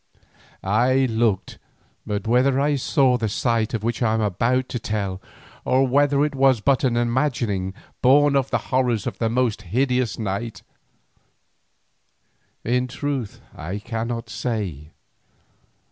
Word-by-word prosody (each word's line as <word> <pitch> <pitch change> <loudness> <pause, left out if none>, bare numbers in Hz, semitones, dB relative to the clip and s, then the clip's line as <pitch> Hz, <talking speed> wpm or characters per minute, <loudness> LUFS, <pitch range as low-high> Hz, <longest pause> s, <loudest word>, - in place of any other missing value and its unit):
I 125 +7 +3
looked, 110 -5 0 0.5
but 105 -1 -3
whether 130 +4 +3
I 145 +1 +2
saw 130 -1 +2
the 110 -3 -2
sight 115 +1 0
of 110 - -4
which 115 +2 -2
I 110 -2 +2
am 110 - 0
about 115 +6 +1
to 120 - -3
tell 100 -5 -3 0.4
or 130 +1 +3
whether 145 +2 +3
it 150 - -3
was 135 -3 +3
but 135 +5 +2
an 120 -3 +2
imagining 120 -6 0 0.3
born 145 +2 +5
of 135 -1 +1
the - - +1 0.2
horrors 125 -5 +1
of - - -4
that 115 - +1
most 120 -3 0
hideous 125 +5 0
night, 110 +2 -4 2.0
in 125 +2 0
truth 135 -3 -4
I 90 +6 -5
cannot 115 +2 -4
say. 95 - -4
120 Hz, 135 wpm, -23 LUFS, 110-130 Hz, 2.0 s, born